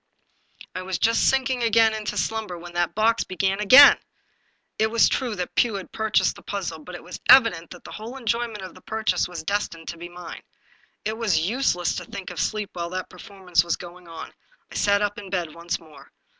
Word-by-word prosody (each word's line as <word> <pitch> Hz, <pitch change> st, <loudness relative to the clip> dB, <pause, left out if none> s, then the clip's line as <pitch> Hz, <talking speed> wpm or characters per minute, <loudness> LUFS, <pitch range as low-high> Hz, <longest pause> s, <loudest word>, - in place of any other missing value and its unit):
I 185 Hz, -, -4 dB
was 185 Hz, 0 st, -3 dB
just 230 Hz, +1 st, +3 dB
sinking 260 Hz, -1 st, 0 dB
again 225 Hz, -1 st, +4 dB
into 215 Hz, -1 st, -4 dB
slumber, 220 Hz, -5 st, -2 dB
when 175 Hz, +1 st, -11 dB
that 175 Hz, -1 st, -1 dB
box 225 Hz, +2 st, +2 dB
began 190 Hz, +2 st, -1 dB
again. 260 Hz, +8 st, +9 dB, 0.8 s
It 220 Hz, 0 st, +3 dB
was 230 Hz, 0 st, +4 dB
true 245 Hz, -5 st, -1 dB
that 180 Hz, -2 st, -4 dB
Pugh 235 Hz, -4 st, +2 dB
had 195 Hz, -2 st, -7 dB
purchased 220 Hz, -1 st, +1 dB
the -, -, -13 dB
puzzle, 180 Hz, -6 st, -4 dB
but 180 Hz, +3 st, -10 dB
it -, -, -10 dB
was 180 Hz, -, -9 dB
evident 230 Hz, -10 st, +6 dB
that 180 Hz, -, -12 dB
the -, -, -11 dB
whole 230 Hz, +5 st, -8 dB
enjoyment 230 Hz, -4 st, -2 dB
of 185 Hz, -, -8 dB
the 185 Hz, -, -16 dB
purchase 220 Hz, -4 st, -1 dB
was 175 Hz, -2 st, -7 dB
destined 170 Hz, -3 st, -3 dB
to 170 Hz, -, -7 dB
be 175 Hz, +1 st, -8 dB
mine. 175 Hz, 0 st, -9 dB, 0.6 s
It 220 Hz, +1 st, -3 dB
was 175 Hz, -8 st, +1 dB
useless 195 Hz, -7 st, 0 dB
to 180 Hz, -, -5 dB
think 195 Hz, +2 st, -7 dB
of -, -, -7 dB
sleep 215 Hz, -2 st, -2 dB
while 170 Hz, -1 st, -4 dB
that 185 Hz, +1 st, -5 dB
performance 185 Hz, -2 st, -1 dB
was 170 Hz, -, -1 dB
going 175 Hz, 0 st, -12 dB
on. 165 Hz, -1 st, -9 dB, 0.4 s
I -, -, -10 dB
sat 200 Hz, 0 st, +2 dB
up 205 Hz, 0 st, -2 dB
in 200 Hz, -2 st, -10 dB
bed 175 Hz, -5 st, -2 dB
once 170 Hz, +1 st, -4 dB
more. 155 Hz, -2 st, -17 dB
195 Hz, 210 wpm, -24 LUFS, 175-220 Hz, 0.8 s, again